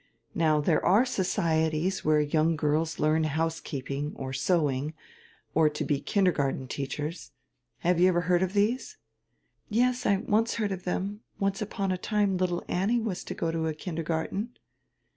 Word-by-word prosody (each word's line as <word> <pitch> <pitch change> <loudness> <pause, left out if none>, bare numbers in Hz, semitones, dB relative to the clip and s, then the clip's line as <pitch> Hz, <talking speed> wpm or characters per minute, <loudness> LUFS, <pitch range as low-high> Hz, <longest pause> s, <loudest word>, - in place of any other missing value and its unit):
Now 155 -2 +3
there 150 0 +2
are 205 +8 +5
societies 165 -4 0
where 155 0 +4
young 155 +2 +2
girls 155 +2 0
learn 155 +1 +2
housekeeping, 150 -2 -2
or 130 -1 -5
sewing, 145 0 0 0.6
or 155 -1 +4
to 150 - -4
he 145 -2 +1
kindergarten 145 -9 +1
teachers. 145 +5 -5 0.5
Have 175 0 +2
you 180 - +6
ever 175 -2 +3
heard 180 0 +2
of 190 0 0
these!" 240 - 0 0.7
"Yes, 250 +3 +1
I 200 - +4
once 220 +4 +1
heard 215 -3 -1
of 185 -2 -5
them. 200 +3 -2 0.2
Once 195 0 -1
upon 200 -2 -2
a 185 - -1
time 205 -2 +1
little 180 -1 0
Annie 205 +7 +1
was 220 -5 -3
to - - -5
go 165 - -1
to 165 0 -1
a 155 - -2
kindergarten." 165 +7 -3
170 Hz, 160 wpm, -28 LUFS, 155-195 Hz, 0.7 s, you